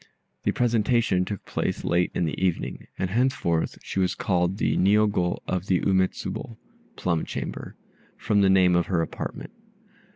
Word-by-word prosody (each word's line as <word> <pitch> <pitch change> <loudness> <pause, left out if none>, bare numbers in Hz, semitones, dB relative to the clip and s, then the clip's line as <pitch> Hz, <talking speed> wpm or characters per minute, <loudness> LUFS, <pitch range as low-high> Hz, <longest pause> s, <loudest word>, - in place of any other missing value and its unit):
The - - +3
presentation 115 -5 +2
took 100 0 -6
place - - -2
late 85 +1 +2
in 85 - +1
the 80 +3 -3
evening, 90 -3 -2
and 95 -1 -2
henceforth 115 -9 0
she - - -3
was 90 -1 +1
called 90 0 0
the - - +1
Niogo 100 -2 +2
of 95 +1 -2
the 95 - +3
Ume 95 -1 +4
Tsubo 115 - -7 0.4
(plum 85 -3 0
chamber), - - -6 0.4
from 100 -1 +1
the 95 - +4
name 95 -2 +5
of 85 - +2
her 85 -3 +1
apartment. - - -6
95 Hz, 160 wpm, -25 LUFS, 90-105 Hz, 0.4 s, name